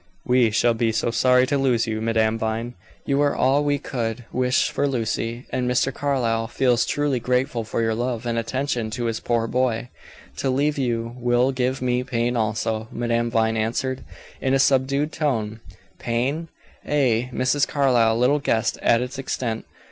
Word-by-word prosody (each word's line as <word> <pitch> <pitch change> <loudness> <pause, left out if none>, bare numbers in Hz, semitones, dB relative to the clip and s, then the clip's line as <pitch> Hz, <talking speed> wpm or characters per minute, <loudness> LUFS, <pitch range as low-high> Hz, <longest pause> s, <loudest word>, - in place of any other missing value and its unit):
"We 125 -2 +4
shall 115 +2 +2
be 115 0 +1
so 115 +1 0
sorry 125 +2 +4
to 140 +1 0
lose 125 -4 +2
you, 110 -1 -3
Madame 110 0 +1
Vine. 110 +2 -2 0.3
You 140 0 +1
are 145 -1 +2
all 135 +3 +3
we 145 -1 +1
could 115 -3 -4
wish 125 +1 +2
for 145 - 0
Lucy, 120 -1 -2
and 125 -1 -1
Mr. 125 +2 +1
Carlyle 120 -6 0
feels 125 0 +1
truly 145 -3 0
grateful 125 0 0
for 110 +1 -2
your 115 0 +1
love 120 0 -2
and 120 -1 -1
attention 120 0 -2
to 120 +2 -3
his 115 -1 -1
poor 115 -1 0
boy." 120 -1 -1 0.5
"To 135 - -1
leave 145 +3 +1
you 115 -2 -1
will 125 +2 +2
give 130 0 -1
me 125 0 +1
pain 120 -1 -1
also," 110 0 -1
Madame 120 0 0
Vine 110 -1 +1
answered, 125 +4 -2 0.4
in 130 0 +2
a - - +4
subdued 140 +2 +2
tone. 115 -9 -1 0.4
Pain? 130 +8 -1 0.4
Ay. 125 -4 +1
Mrs. 130 +3 +1
Carlyle 120 -6 +3
little 130 +5 +3
guessed 115 -6 0
at 115 +1 +3
its 130 +2 -6
extent. 120 -4 -3
125 Hz, 170 wpm, -23 LUFS, 115-130 Hz, 0.5 s, We